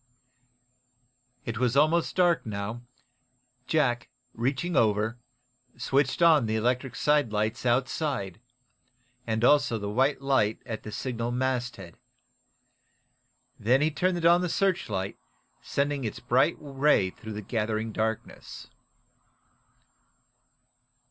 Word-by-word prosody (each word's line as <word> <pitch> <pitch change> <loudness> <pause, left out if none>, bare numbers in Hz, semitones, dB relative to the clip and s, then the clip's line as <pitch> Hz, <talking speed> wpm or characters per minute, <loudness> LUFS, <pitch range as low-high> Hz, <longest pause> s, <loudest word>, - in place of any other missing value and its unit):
It 115 0 -4
was 125 +1 +1
almost 160 +3 +3
dark 175 -2 +3
now. 105 +2 -5 0.9
Jack, 130 -6 +1 0.2
reaching 135 +9 -1
over, 110 +2 +2 0.6
switched 135 +5 +1
on 155 -8 +5
the 110 - -1
electric 125 +3 -1
sidelights 115 -6 +1
outside, 120 -4 -1 0.9
and 110 0 -1
also 135 -3 +4
the 100 -1 -4
white 135 +6 +2
light 130 -6 +1
at 110 -3 -5
the 105 - -8
signal 120 0 -3
masthead. 125 -7 -3 1.6
Then 125 +5 +3
he 155 +1 +2
turned 175 +1 0
on 175 +1 +6
the 180 - -1
searchlight, 140 - -1 0.4
sending 140 -1 -1
its 110 - -4
bright 130 +6 +2
ray 140 -9 +2
through 110 +3 -9
the 105 0 -6
gathering 110 +1 -2
darkness. 110 +1 -4
125 Hz, 105 wpm, -27 LUFS, 110-145 Hz, 1.6 s, on